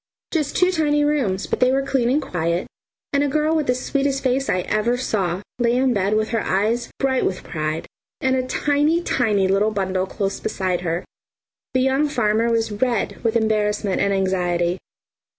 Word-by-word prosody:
Just 305 -4 -1
two 360 0 +4
tiny 295 -4 +2
rooms, 250 -11 0
but - - -2
they 255 0 +4
were 270 +1 +1
clean 265 -4 +1
and 275 +4 +3
quiet, 170 - -1 0.5
and 280 0 +3
a - - +1
girl 305 +3 +1
with 310 -3 0
the 250 - +2
sweetest 275 +1 -1
face 265 +1 +1
I 180 - +1
ever 215 +6 0
saw, 195 -7 -1 0.2
lay 240 0 +2
in 260 +1 +3
the - - +2
bed 200 0 +1
with 215 0 0
her 230 -2 0
eyes 220 +5 0
bright 265 -1 +1
with 185 - -2
pride, 155 0 -3 0.3
and 260 0 +1
a 255 -1 -1
tiny, 295 +5 +1
tiny 210 - +1
little 195 +3 +2
bundle 190 -2 -1
close 195 0 -3
beside 185 -2 -2
her. 170 0 -2 0.7
The 255 - +4
young 270 +3 +2
farmer 230 -3 +1
was 225 -1 0
red 235 +1 -1
with 230 -1 +1
embarrassment 210 -3 +1
and 200 - +2
anxiety. 180 -2 0
230 Hz, 185 wpm, -22 LUFS, 195-270 Hz, 0.7 s, two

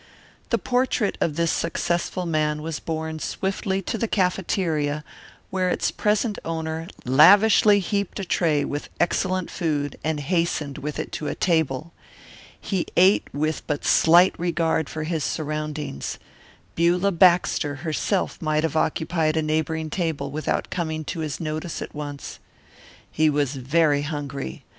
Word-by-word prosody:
The 230 - +2
portrait 245 -2 0
of 155 - +1
this 170 0 +1
successful 175 +2 -1
man 150 -2 0
was 160 -2 -4
borne 160 -1 -4
swiftly 190 +2 -2
to 225 - -3
the 230 - 0
cafeteria 170 -6 0 0.5
where 185 -1 +1
its - - 0
present 210 0 0
owner 160 0 -3 0.2
lavishly 205 - +6
heaped 200 +1 -2
a 195 - -3
tray 155 -5 +1
with 145 +1 -4
excellent 185 0 0
food 145 -4 -2
and 155 0 -1
hastened 150 -2 -1
with 150 +1 -4
it - - -4
to 150 - -4
a - - -2
table. 160 -2 0 0.7
He 190 -4 -2
ate 185 +3 +5
with 155 +2 -1
but 150 -2 -2
slight 175 +3 +6
regard 165 -3 0
for 155 - -4
his 160 -1 -2
surroundings. 150 - -3 0.6
Beulah 175 +4 +2
Baxter 170 -5 +3
herself 175 +4 -1
might 155 -1 +1
have 160 -1 -1
occupied 160 0 +1
a 160 - +1
neighbouring 155 0 -1
table 155 -6 -2
without 155 +2 -2
coming 160 -3 -3
to 165 - -4
his 150 -4 -3
notice 155 +1 -4
at - - -7
once. 145 -1 -7 0.7
He 155 0 +3
was 145 -2 0
very 145 +2 +2
hungry. 145 - -5
160 Hz, 145 wpm, -24 LUFS, 150-180 Hz, 0.7 s, lavishly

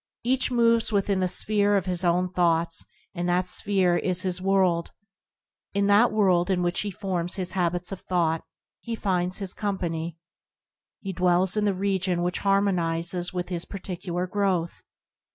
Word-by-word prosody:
Each 255 +2 +2
moves 230 -2 +3
within 200 -1 +1
the 185 - +1
sphere 205 +2 +2
of 190 - -1
his 180 -1 -1
own 180 +1 +2
thoughts, 170 -2 +1 0.3
and 175 -1 -2
that 180 +1 +2
sphere 180 -1 +1
is 185 0 -1
his 185 -1 -1
world. 185 -3 +2 0.9
In 200 0 +2
that 205 +4 +5
world 190 -4 +2
in 180 -2 +1
which 175 0 +1
he 205 - -3
forms 185 -3 -2
his 185 -2 -1
habits 175 -1 -1
of 195 - -5
thought, 165 -3 0 0.4
he 230 -1 -5
finds 185 -3 -1
his 195 -3 -1
company. 170 -5 -3 0.8
He 195 -1 -5
dwells 180 +1 +2
in 210 -1 +1
the 200 -2 +1
region 190 -2 0
which 180 0 -1
harmonizes 180 -3 0
with 180 -1 -4
his 175 -2 -3
particular 180 -2 -4
growth. 185 -3 -1
185 Hz, 160 wpm, -25 LUFS, 175-200 Hz, 0.9 s, that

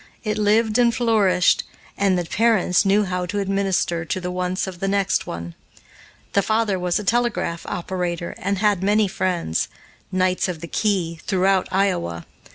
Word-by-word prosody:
It 215 -1 -2
lived 215 +2 +2
and 240 -1 +5
flourished, 205 -7 +3 0.3
and 195 -2 +2
the 175 - -1
parents 205 -1 +2
knew 200 +2 +4
how 180 -2 -2
to 205 +4 -3
administer 195 -4 0
to 170 - -3
the 180 0 -4
wants 180 +1 -1
of 185 -2 -8
the 195 - -1
next 200 0 +1
one. 85 0 -6 0.8
The 200 - +4
father 215 -2 0
was 180 -1 0
a 210 - -3
telegraph 230 -6 0
operator 175 -1 -3
and 200 0 -1
had 205 -2 +2
many 205 +2 +3
friends 180 - -1 0.4
knights 185 0 +1
of 180 -3 -4
the 170 - -7
key 175 -5 -1
throughout 190 0 +2
Iowa. 85 - 0
190 Hz, 165 wpm, -22 LUFS, 180-205 Hz, 0.8 s, and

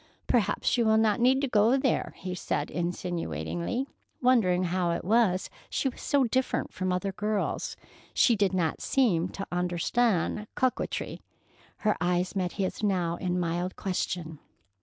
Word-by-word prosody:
"Perhaps 215 +2 +1
you 235 - +3
will 220 0 +5
not 220 -2 +3
need 260 +3 +4
to 280 - +1
go 230 +2 +4
there," 265 -1 0
he 185 -1 -5
said 180 - -2
insinuatingly, 175 - -2 0.3
wondering 215 -8 +3
how 180 0 0
it 170 - -2
was 205 -3 +3 0.2
she 270 - 0
was - - -11
so 285 -2 +2
different 260 +2 0
from 185 0 -1
other 180 +2 -1
girls. 210 +1 -2 0.3
She 235 - +4
did 200 -3 +2
not 175 -4 0
seem 185 -10 +2
to 195 - -6
understand 180 +4 0
coquetry. 255 -1 -1 0.6
Her 210 - +4
eyes 180 +2 0
met 180 -2 -1
his 195 -1 -2
now 180 -5 0
in 180 0 -1
mild 175 +1 -2
question. 175 -4 -3
185 Hz, 150 wpm, -28 LUFS, 175-225 Hz, 0.6 s, will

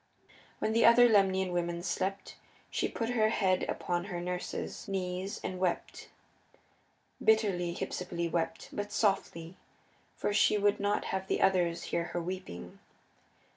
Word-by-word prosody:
When 220 - -1
the 230 - +4
other 240 +1 +8
Lemnian 190 -4 +3
women 175 -1 -2
slept 190 +2 -3 0.4
she - - 0
put 230 +1 -3
her 220 -3 +3
head 190 -4 +1
upon 175 0 -2
her 180 -4 -4
nurse's, 180 +1 -4
knees 190 0 -3
and 185 - -4
wept; 180 -2 -2 1.1
bitterly 195 -6 +2
Hypsipyle 170 -2 -3
wept, 165 0 -2
but 205 0 -4
softly, 180 -4 -1 0.6
for 205 - -1
she 210 0 +4
would 205 0 +2
not 205 +1 0
have 190 0 -2
the - - 0
others 175 -3 +2
hear 170 - -1
her 175 - -3
weeping. 165 - -6
185 Hz, 135 wpm, -31 LUFS, 175-205 Hz, 1.1 s, other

